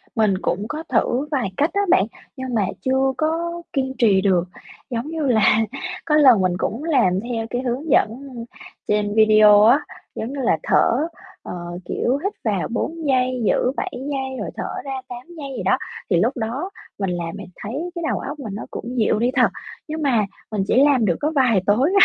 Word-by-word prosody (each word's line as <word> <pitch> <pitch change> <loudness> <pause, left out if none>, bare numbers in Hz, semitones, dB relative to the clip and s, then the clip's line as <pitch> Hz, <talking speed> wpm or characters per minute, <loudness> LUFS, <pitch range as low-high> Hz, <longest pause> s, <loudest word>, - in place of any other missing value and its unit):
Mình 215 -4 +2
cũng 195 +1 -2
có 310 +1 -4
thử 250 +3 +1
vài 255 -10 -1
cách 295 - +2
á 400 - +2
bạn, 190 - +5 0.3
nhưng 260 -1 -4
mà 215 -4 +2 0.2
chưa 265 0 +1
có 335 +2 -1
kiên 265 -2 -1
trì 205 -6 +4
được. 185 -3 +3 0.5
Giống 240 +1 -3
như 315 -2 -2
là, 220 -3 +4 0.5
có 305 -2 +2
lần 260 -9 +6
mình 185 -1 +2
cũng 230 +8 -3
làm 245 - +2
theo 225 -2 -2
cái 245 - -2
hướng 260 +5 -3
dẫn 245 - +4 0.8
trên 210 0 +1
video 215 -1 +7
á, 240 +6 +6 0.4
giống 235 +5 -4
như 280 - -5
là, 225 -9 +2
thở, 285 +7 +3 0.4
ờ, - - -6 0.3
kiểu, 255 +3 0
hít 400 +2 -1
vào 205 -5 0
4 320 +7 -3
giây, 255 -2 +1
giữ 250 - +2
7 - - -2
giây 265 0 -4
rồi - - -3
thở - - -4
ra 270 -1 -4
8 245 +3 -9
giây 275 -3 -6
gì - - -4
đó, - - +3 0.3
thì 180 - +3
lúc 235 +8 +1
đó 245 +10 -3 0.3
mình 195 -2 -1
làm 175 -1 -3
mình - - -9
thấy 275 +12 -4
cái 340 - -4
đầu - - -1
óc 290 +2 -6
mình 220 -7 -6
nó 210 - -6
cũng 250 +2 -6
dịu 215 -2 +2
đi 240 +2 +2
thật. 255 - +5 0.4
Nhưng 310 0 -4
mà 245 -8 +2 0.3
mình 210 -3 0
chỉ - - +2
làm 270 -6 +3
được 175 -4 +2
có 300 - 0
vài 245 -8 +4
tối 245 - +3
250 Hz, 205 wpm, -21 LUFS, 215-280 Hz, 0.8 s, video